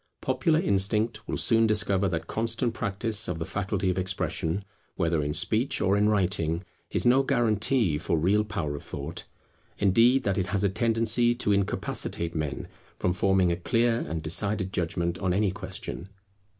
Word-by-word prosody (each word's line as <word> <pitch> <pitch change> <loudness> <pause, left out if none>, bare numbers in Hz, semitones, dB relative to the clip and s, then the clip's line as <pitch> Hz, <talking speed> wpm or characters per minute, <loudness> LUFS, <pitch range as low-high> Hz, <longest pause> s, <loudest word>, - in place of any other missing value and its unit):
Popular 130 +5 +1
instinct 105 +1 +1
will - - -2
soon 115 -1 +3
discover 100 -2 +2
that 85 -3 -3
constant 115 +1 -2
practice 105 +1 0
of 90 - -3
the 80 - -4
faculty 95 0 -2
of 90 - -2
expression, 95 0 -2 0.3
whether 85 -3 0
in 75 0 -2
speech 110 - +1
or 95 +2 +2
in 105 +1 +3
writing, 90 -4 0 0.3
is - - -1
no 125 +2 +5
guarantee 115 - +1
for 85 - 0
real 100 +7 +2
power 100 -8 -3
of 70 - -7
thought; - - -6 0.5
indeed 115 +7 +4
that 100 -4 0
it 95 - -1
has 100 +1 0
a 100 - +3
tendency 115 +2 +2
to 120 -4 0
incapacitate 95 -3 -1
men 75 -4 -3 0.3
from 90 - 0
forming 95 -1 +2
a - - +1
clear 115 +6 +1
and 80 0 -4
decided 95 +3 0
judgment 85 0 -2
on 95 -2 0
any 100 0 +1
question. 95 0 -7
100 Hz, 165 wpm, -27 LUFS, 90-115 Hz, 0.5 s, no